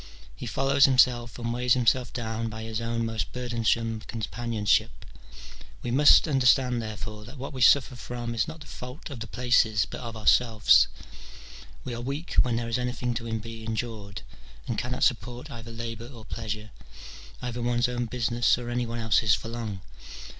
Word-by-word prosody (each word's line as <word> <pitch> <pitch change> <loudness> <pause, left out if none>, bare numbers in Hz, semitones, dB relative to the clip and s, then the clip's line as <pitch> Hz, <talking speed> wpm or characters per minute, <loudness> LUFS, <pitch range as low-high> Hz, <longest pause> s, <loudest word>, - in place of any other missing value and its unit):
he - - -7
follows 135 0 +4
himself 125 -3 +3
and 115 -1 -3
weighs 125 +1 +2
himself 125 0 +2
down 115 -1 -3
by 110 0 -7
his 110 0 -4
own 115 0 -1
most 115 -1 -3
burdensome 115 -2 0
companionship. 110 - -1 0.8
We 120 - -2
must 145 +5 +6
understand, 125 -3 +3
therefore, 110 -1 -7
that 125 +5 -11
what 135 +2 -6
we 130 - -6
suffer 130 +1 +5
from 120 -1 -5
is 115 - 0
not 160 0 -8
the - - -10
fault 125 +3 -9
of 130 - -6
the 115 - -6
places 115 -5 +2
but - - -8
of 115 -2 -6
ourselves: 110 -1 +5 1.0
we 125 - -5
are 120 - -5
weak 140 +7 -4
when 125 -2 0
there 115 0 -2
is 115 +2 -1
anything 125 0 -2
to 115 -1 -4
be 115 0 -8
endured, 110 - -5 0.4
and - - -1
cannot - - -2
support 125 +6 -1
either 115 -2 -8
labour 115 0 -6
or 115 -4 -12
pleasure, 110 -2 -5 0.7
either 120 -1 -4
one's 120 +1 +1
own 120 -1 -2
business 120 0 +1
or 120 -1 -5
any 120 0 -1
one 115 +1 -4
else's 110 -1 +3
for 115 - -7
long. 110 -5 -5
120 Hz, 175 wpm, -27 LUFS, 115-125 Hz, 1.0 s, must